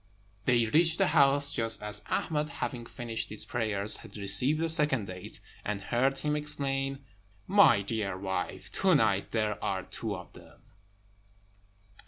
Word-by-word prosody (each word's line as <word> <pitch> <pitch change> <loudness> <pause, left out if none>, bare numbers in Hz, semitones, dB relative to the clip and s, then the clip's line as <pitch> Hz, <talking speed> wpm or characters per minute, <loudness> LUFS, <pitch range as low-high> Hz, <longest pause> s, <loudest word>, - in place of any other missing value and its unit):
They 120 -2 +3
reached 160 +7 +2
the 195 - +2
house 145 -1 +3
just 115 -3 -1
as 105 0 -4
Ahmed, 150 -1 -2
having 120 -3 -6
finished 115 -3 -5
his 105 - -6
prayers, 105 -3 +3
had - - -12
received 105 +10 +5
the 165 - 0
second 150 -8 +4
date, 90 -1 -9 0.2
and 105 -1 -3
heard 125 +7 -1
him 150 +2 -2
exclaim, 135 -2 -3 0.4
"My 195 - +4
dear 100 -3 -3
wife, 95 -1 -5
to 190 -3 +4
night 105 -7 +1
there 110 -2 -2
are 95 -1 -2
two 110 +2 -5
of 90 -4 -11
them!" - - -17
120 Hz, 150 wpm, -29 LUFS, 105-145 Hz, 0.4 s, received